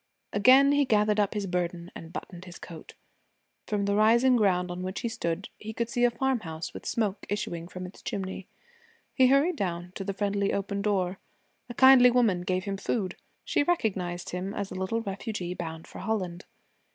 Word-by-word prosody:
Again 260 Hz, +7 st, +6 dB
he 285 Hz, 0 st, +4 dB
gathered 210 Hz, -4 st, +2 dB
up 205 Hz, +1 st, +1 dB
his 205 Hz, -1 st, -1 dB
burden 175 Hz, -1 st, -3 dB
and 165 Hz, 0 st, -10 dB
buttoned 180 Hz, 0 st, -8 dB
his 180 Hz, -1 st, -10 dB
coat. 165 Hz, -3 st, -11 dB, 0.7 s
From 205 Hz, -1 st, 0 dB
the 200 Hz, -, +1 dB
rising 235 Hz, +5 st, +5 dB
ground 180 Hz, -5 st, +2 dB
on 175 Hz, +1 st, -5 dB
which 185 Hz, +1 st, -4 dB
he -, -, -1 dB
stood 190 Hz, -5 st, -3 dB
he 220 Hz, +1 st, -7 dB
could 235 Hz, +1 st, -2 dB
see 245 Hz, -2 st, 0 dB
a -, -, +5 dB
farmhouse 225 Hz, -11 st, -2 dB
with -, -, -8 dB
smoke 210 Hz, -4 st, -1 dB
issuing 175 Hz, -5 st, -3 dB
from 185 Hz, 0 st, -7 dB
its 180 Hz, -, -11 dB
chimney. 190 Hz, -1 st, -5 dB, 0.7 s
He 260 Hz, -2 st, +5 dB
hurried 285 Hz, +6 st, +3 dB
down 175 Hz, -3 st, -3 dB
to 195 Hz, -, -5 dB
the 195 Hz, 0 st, -4 dB
friendly 200 Hz, 0 st, 0 dB
open 200 Hz, 0 st, -2 dB
door. 190 Hz, -3 st, 0 dB, 0.5 s
A 240 Hz, -, -7 dB
kindly 260 Hz, -1 st, +8 dB
woman 230 Hz, -7 st, +2 dB
gave 185 Hz, +1 st, -1 dB
him 200 Hz, -1 st, -3 dB
food. 195 Hz, -2 st, -2 dB, 0.3 s
She -, -, +1 dB
recognized 195 Hz, -, -1 dB
him 185 Hz, +3 st, -4 dB
as 200 Hz, -1 st, -4 dB
a -, -, -5 dB
little 190 Hz, +5 st, -2 dB
refugee 195 Hz, -3 st, -4 dB
bound 160 Hz, -2 st, -6 dB
for -, -, -11 dB
Holland. 185 Hz, -5 st, -3 dB
200 Hz, 190 wpm, -28 LUFS, 180-225 Hz, 0.7 s, kindly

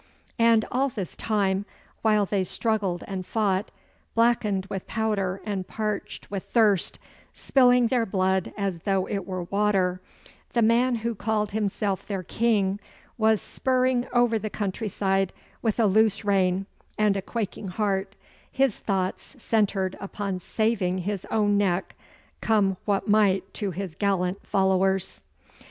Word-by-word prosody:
And 230 Hz, -1 st, +5 dB
all 270 Hz, +2 st, +1 dB
this 200 Hz, -8 st, -6 dB
time, 200 Hz, -3 st, 0 dB, 0.4 s
while 215 Hz, -2 st, +3 dB
they 195 Hz, -1 st, 0 dB
struggled 200 Hz, -2 st, -1 dB
and 190 Hz, -2 st, -4 dB
fought, 205 Hz, 0 st, 0 dB, 0.5 s
blackened 230 Hz, -4 st, +2 dB
with 195 Hz, -1 st, -6 dB
powder 200 Hz, -4 st, -1 dB
and 195 Hz, -3 st, -3 dB
parched 215 Hz, -2 st, -4 dB
with 195 Hz, -2 st, -4 dB
thirst, 210 Hz, -6 st, +2 dB, 0.4 s
spilling 250 Hz, -2 st, +4 dB
their 230 Hz, -1 st, +1 dB
blood 190 Hz, -1 st, +1 dB
as 195 Hz, -4 st, -2 dB
though 190 Hz, +1 st, 0 dB
it 195 Hz, -3 st, -4 dB
were 185 Hz, -2 st, -3 dB
water, 190 Hz, -1 st, +1 dB, 0.5 s
the 235 Hz, -, +3 dB
man 240 Hz, +3 st, +3 dB
who 235 Hz, -, +1 dB
called 210 Hz, 0 st, -1 dB
himself 200 Hz, -2 st, -1 dB
their 195 Hz, -3 st, -3 dB
King 205 Hz, -1 st, +1 dB, 0.4 s
was 220 Hz, -2 st, +3 dB
spurring 255 Hz, -1 st, +1 dB
over 240 Hz, -2 st, +3 dB
the 215 Hz, +1 st, -4 dB
countryside 195 Hz, -2 st, -1 dB, 0.3 s
with 225 Hz, 0 st, 0 dB
a 225 Hz, -, +5 dB
loose 215 Hz, +1 st, +3 dB
rein 190 Hz, -1 st, +2 dB, 0.3 s
and 210 Hz, -2 st, +3 dB
a 195 Hz, -, -1 dB
quaking 210 Hz, -1 st, -4 dB
heart, 195 Hz, 0 st, -1 dB, 0.4 s
his 265 Hz, -4 st, +1 dB
thoughts 190 Hz, +6 st, -2 dB
centred 200 Hz, -5 st, 0 dB
upon 195 Hz, -1 st, -4 dB
saving 200 Hz, -2 st, 0 dB
his 195 Hz, +1 st, -3 dB
own 205 Hz, -2 st, +2 dB
neck, 190 Hz, -2 st, 0 dB, 0.5 s
come 205 Hz, -4 st, +2 dB
what 200 Hz, -2 st, 0 dB
might 195 Hz, -3 st, +3 dB
to 205 Hz, -, -2 dB
his 185 Hz, -1 st, -5 dB
gallant 190 Hz, 0 st, 0 dB
followers. 190 Hz, -1 st, +1 dB
200 Hz, 140 wpm, -26 LUFS, 190-220 Hz, 0.5 s, And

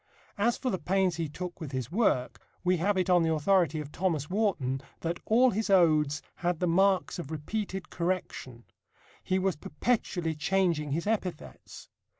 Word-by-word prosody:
As 235 Hz, +4 st, +2 dB
for 255 Hz, -, -2 dB
the 185 Hz, -, -2 dB
pains 185 Hz, -2 st, +1 dB
he 165 Hz, -3 st, -2 dB
took 175 Hz, +3 st, -7 dB
with 145 Hz, -4 st, -6 dB
his 130 Hz, +1 st, -3 dB
work, 175 Hz, -, +1 dB, 0.2 s
we 180 Hz, 0 st, +2 dB
have 195 Hz, +4 st, +1 dB
it 185 Hz, 0 st, +1 dB
on 180 Hz, -1 st, +5 dB
the 165 Hz, -1 st, +2 dB
authority 160 Hz, -1 st, +2 dB
of 150 Hz, -1 st, -7 dB
Thomas 165 Hz, -4 st, -1 dB
Warton 160 Hz, -, 0 dB, 0.2 s
that 170 Hz, +1 st, -2 dB
"all 245 Hz, +3 st, +5 dB
his 215 Hz, +2 st, -2 dB
odes... 155 Hz, -6 st, +3 dB
had 175 Hz, -2 st, -1 dB
the 180 Hz, -, +1 dB
marks 190 Hz, +2 st, +2 dB
of 145 Hz, -, -6 dB
repeated 190 Hz, +4 st, -4 dB
correction: 170 Hz, -9 st, -3 dB, 0.6 s
he 185 Hz, -, 0 dB
was 190 Hz, -1 st, 0 dB
perpetually 165 Hz, -, -1 dB
changing 165 Hz, -1 st, 0 dB
his 165 Hz, +3 st, -2 dB
epithets." 200 Hz, -6 st, -4 dB
175 Hz, 165 wpm, -29 LUFS, 155-195 Hz, 0.6 s, on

